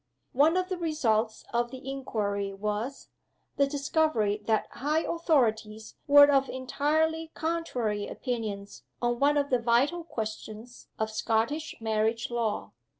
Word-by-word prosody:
One 310 +7 +4
of 370 0 0
the 370 -2 -3
results 230 -10 0
of 240 0 +1
the 260 +1 -10
inquiry 205 -7 -2
was, 210 +6 -4 0.5
the 280 - +4
discovery 275 -7 +1
that 220 -1 +2
high 300 +5 0
authorities 225 -10 0
were 285 0 +9
of 270 -1 +3
entirely 315 +5 0
contrary 250 -11 -2
opinions 215 -5 -5 0.2
on 240 0 0
one 290 +1 +3
of 285 -1 0
the 250 - +3
vital 250 +9 +2
questions 220 -2 -7
of 220 0 -2
Scottish 230 +8 -1
marriage 225 +1 0
law. 230 -3 -2
245 Hz, 130 wpm, -28 LUFS, 220-290 Hz, 0.5 s, were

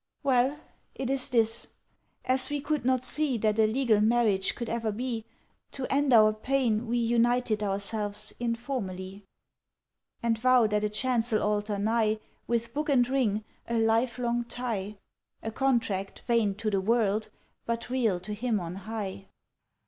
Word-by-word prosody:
"Well, 270 +2 +2 0.4
it 265 0 -2
is 270 -1 +1
this. 230 -1 +1 0.6
As 260 0 +2
we 290 0 -1
could 300 0 -1
not 255 -1 +2
see 295 -2 +1
That 215 0 0
a 220 - +5
legal 225 -2 +2
marriage 215 -4 +2
could 235 - -5
ever 230 -1 -1
be, 230 0 -3 0.5
To 270 - -3
end 285 0 +2
our 215 -2 +6
pain 240 -1 0
We 240 +1 0
united 235 -1 +2
ourselves 205 +1 -1
informally; 210 -6 -4 1.0
"And 230 -1 +1
vowed 245 -3 +4
at 210 0 +1
a 210 - +1
chancel 230 0 +1
altar 210 0 0
nigh, 215 +1 +1 0.3
With 235 -1 -1
book 300 +1 -2
and 250 -4 +4
ring, 220 -6 0 0.2
a 235 - -1
lifelong 235 +1 +1
tie; 225 -4 -4 0.5
A 225 - -3
contract 230 -6 -1
vain 230 -5 +2
To 215 +1 -2
the 195 -1 +1
world, 215 0 +1 0.4
but 235 +1 -3
real 225 -8 +1
to 210 +3 -6
Him 220 0 -1
on 170 -1 -5
High." 195 0 -6
230 Hz, 150 wpm, -28 LUFS, 210-250 Hz, 1.0 s, our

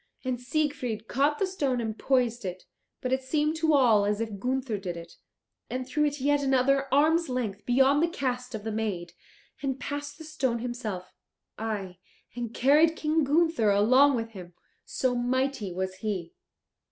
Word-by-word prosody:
And 255 -2 -2
Siegfried 255 -5 -2
caught 285 +3 +1
the 390 - +1
stone 285 -10 -1
and 220 -2 -3
poised 245 -2 +1
it 185 -1 -5 0.4
but 255 0 -1
it 260 - +1
seemed 300 +3 0
to 315 -1 +3
all 230 -7 +5
as 205 +1 0
if 220 -3 -4
Gunther 255 -2 -1
did 180 -3 -5
it 170 0 -10 0.6
and 255 0 -3
threw 300 +3 +1
it 290 0 -1
yet 290 +2 +2
another 275 0 +2
arm's 315 +3 +3
length 220 -5 -3
beyond 270 +4 +4
the 335 - +3
cast 250 -6 -3
of 210 - -6
the 220 - -3
maid, 200 -6 -3 0.5
and 270 -2 -2
passed 285 +1 -5
the 320 - -10
stone 265 -6 -1
himself, 225 -6 -5 0.5
aye, 200 -5 -4 0.4
and 240 -2 -4
carried 300 +7 +4
King 310 0 +1
Gunther 300 -5 +2
along 255 +8 +5
with 225 -1 -3
him, 180 -4 -11 0.3
so 255 -1 0
mighty 245 -3 -1
was 185 +1 -3
he! 190 -5 -4
255 Hz, 170 wpm, -28 LUFS, 215-285 Hz, 0.6 s, all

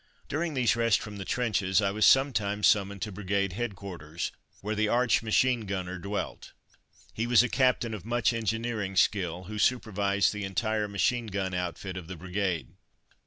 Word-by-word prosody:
During 155 +1 -2
these 125 -3 +3
rests 115 -2 +3
from 105 -1 -8
the 95 - -6
trenches 105 -6 +1
I 100 -2 +1
was 105 +2 +3
sometimes 105 -7 +3
summoned 100 -1 +2
to 105 - -4
Brigade 100 -1 -1
Headquarters, 95 -8 -5 0.3
where 105 +2 -2
the 110 0 +1
arch 120 +2 +3
machine 115 0 +2
gunner 95 -2 -3
dwelt. 100 +3 -5 0.6
He 115 +2 -2
was 120 -1 +6
a - - +1
captain 125 -3 +2
of 105 - -6
much 120 +2 +1
engineering 115 -3 -2
skill, 90 -2 +1
who 105 +3 -6
supervised 100 -5 +2
the 105 -1 -4
entire 105 +2 -1
machine 115 +4 0
gun 95 -2 -2
outfit 90 +1 -4
of 90 -3 -7
the 95 - -6
Brigade. 90 -5 -2
105 Hz, 165 wpm, -28 LUFS, 95-115 Hz, 0.6 s, was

